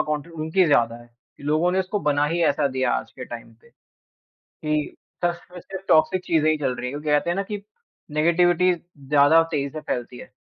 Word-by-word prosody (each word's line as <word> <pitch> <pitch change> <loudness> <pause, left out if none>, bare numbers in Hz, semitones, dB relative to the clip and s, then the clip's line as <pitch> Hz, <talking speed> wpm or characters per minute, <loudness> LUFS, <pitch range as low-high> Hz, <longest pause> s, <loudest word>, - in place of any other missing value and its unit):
content 160 +3 -8
उनकी 160 +4 +1
ज़्यादा 115 -6 +3
है 120 - -18 0.3
कि - - -16
लोगों 155 +4 +2
ने 190 - +1
इसको 190 +3 -2
बना 145 -2 +2
ही 170 +3 -1
ऐसा 145 -1 +2
दिया 130 0 0
आज - - -2
के 125 - -5
टाइम 115 -1 -9
पे - - -22 0.7
कि 150 -1 -3 0.3
बस 175 0 +1
इसमें 180 0 -12
सिर्फ 190 +2 -9
टॉक्सिक 180 +3 +3
चीज़ें 155 -2 +2
ही 155 - +2
चल 135 -4 -1
रही 125 - -5
हैं 125 - -4
क्योंकि 150 +1 -5
कहते 150 +3 +2
हैं 175 - 0
ना 195 - 0
कि 205 0 -6 0.5
नेगेटिविटी 175 +3 +3 0.4
ज़्यादा 150 +3 +6
तेज़ी 140 -3 -1
से 155 - -6
फैलती 125 -3 -4
है, - - -12
155 Hz, 215 wpm, -23 LUFS, 145-175 Hz, 0.7 s, ज़्यादा